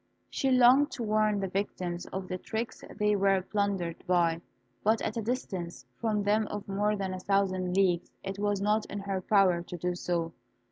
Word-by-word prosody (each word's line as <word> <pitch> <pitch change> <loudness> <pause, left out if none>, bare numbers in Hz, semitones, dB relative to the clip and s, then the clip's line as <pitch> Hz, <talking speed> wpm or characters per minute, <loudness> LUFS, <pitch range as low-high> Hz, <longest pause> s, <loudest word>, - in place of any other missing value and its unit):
She 270 - 0
longed 255 +3 +6
to 240 - -4
warn 215 -1 +2
the 195 - -1
victims 180 -2 -3
of 190 -1 -5
the 185 0 -4
tricks 225 +4 -4
they 210 0 +2
were 195 -1 +2
plundered 195 -5 -2
by; 170 -2 +2 0.4
but 220 +2 +3
at 215 - -2
a 230 - -1
distance 195 -7 -4
from 215 -3 -1
them 210 +1 +2
of 205 -1 -6
more 205 +2 +1
than 195 -2 -3
a 185 - -5
thousand 185 -1 0
leagues 180 -3 +2
it 195 0 -5
was 205 -1 0
not 210 +1 +1
in 205 - -6
her 195 -1 -2
power 185 -3 +3
to 175 +1 -7
do 180 +2 -1
so. 170 -2 -2
195 Hz, 190 wpm, -29 LUFS, 185-210 Hz, 0.4 s, longed